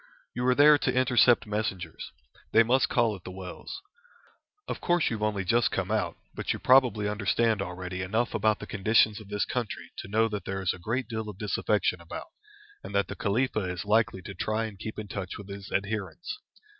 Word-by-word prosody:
You 125 +1 -1
are 125 - +4
there 145 +1 +7
to - - +1
intercept 125 -1 +4
messengers. 105 -6 -3 0.4
They 115 - +7
must 125 +3 +3
call 115 -3 +2
at 90 - -13
the - - -7
wells. 95 - -8 0.8
Of - - -4
course 175 -5 +2
you 115 - -1
have - - -10
only 105 -2 0
just 120 +5 +3
come 95 +1 -2
out, 110 -1 0 0.2
but - - -2
you - - -4
probably 125 -5 +4
understand 105 +2 +1
already 90 +1 -5
enough 110 +6 0
about 110 -1 +2
the - - -8
conditions 110 +1 +3
of 105 - -13
this 105 0 0
country 120 -4 -4
to - - -6
know 110 +3 +2
that 105 -2 -5
there 95 0 -3
is 90 - +1
a - - -10
great 120 +6 -2
deal 110 -2 -4
of 100 - -8
disaffection 105 -3 0
about, 85 - -8 0.5
and 100 - -7
that 100 -2 +2
the - - -5
Khalifa 110 0 0
is 90 -1 -4
likely 105 -3 +2
to 100 - -7
try 110 +4 -1
and 105 -3 -8
keep 110 - -6
in 105 -1 -5
touch 95 -2 -5
with 100 -1 -10
his 100 0 -8
adherents. 105 - -3
105 Hz, 205 wpm, -28 LUFS, 95-115 Hz, 0.8 s, there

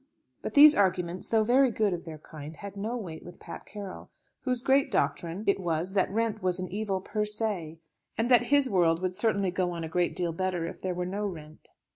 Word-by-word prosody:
But - - -6
these 295 +1 +10
arguments, 185 - 0
though 220 -1 +3
very 255 +4 +4
good 215 -4 0
of 175 - -5
their 160 -2 -7
kind, 155 0 -10
had 200 +2 -9
no 220 +5 -3
weight 175 -8 -7
with 175 - -12
Pat - - -9
Carroll, 200 -3 -8 0.3
whose 250 -2 -1
great 270 +1 +3
doctrine 170 +4 -1
it 200 - +2
was 175 +1 -2
that 195 -2 +2
rent 220 +1 -1
was 185 0 +1
an 185 -1 -5
evil 200 -1 -2
per 210 +2 -2
se; 210 -7 -1 0.4
and 235 +3 0
that 245 -1 +6
his 285 +1 +3
world 170 -6 +2
would 185 0 0
certainly 200 -2 0
go 180 0 0
on 170 -1 -5
a - - -3
great 175 +2 0
deal 175 -2 -1
better 180 -1 -2
if 170 - -7
there 185 -1 -2
were 180 0 -2
no 205 +3 -2
rent. 155 -4 -10
190 Hz, 220 wpm, -28 LUFS, 175-220 Hz, 0.4 s, these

